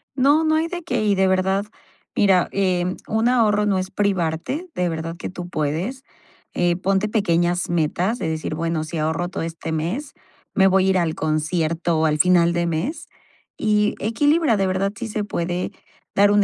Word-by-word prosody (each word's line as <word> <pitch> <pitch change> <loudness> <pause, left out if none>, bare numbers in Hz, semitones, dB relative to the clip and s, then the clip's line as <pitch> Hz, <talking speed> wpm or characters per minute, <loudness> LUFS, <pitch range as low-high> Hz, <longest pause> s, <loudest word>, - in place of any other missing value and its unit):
No, 285 +4 +4
no 315 0 +2
hay 320 +1 +1
de 350 -1 -6
qué. 235 -6 -1
Y 205 - +3
de 190 0 +3
verdad. 190 +2 +1 0.5
Mira, 190 -3 +3
em, 185 -2 0
un 220 +2 +1
ahorro 210 -4 +3
no 200 -2 +2
es 185 0 -2
privarte 200 - -1
de 180 -1 0
verdad 165 0 -4
que - - -5
tú 180 -1 -7
puedes, 170 - -2 0.5
eh, 175 -1 +1
ponte 195 +3 0
pequeñas 175 -5 +1
metas 175 +7 0
de - - -2
decir: 155 -1 -3
"Bueno, 165 -1 -1
si 160 +1 -5
ahorro 160 +3 -1
todo - - -4
este 165 -1 -5
mes, 185 - -3 0.4
me 190 -1 +5
voy 190 0 +3
a - - +3
ir 190 - +3
al 165 -3 0
concierto 160 +1 0
al 150 -1 +1
final 175 -2 +4
de 170 0 0
mes", 260 - -3 0.5
y 210 -1 +2
equilibra, 290 +3 +2
de 195 -1 +1
verdad 185 +1 0
sí, 235 - -4
se 210 -1 -2
puede 180 -1 -2 0.4
dar 205 +1 +5
un 205 0 +4
185 Hz, 185 wpm, -22 LUFS, 165-210 Hz, 0.5 s, me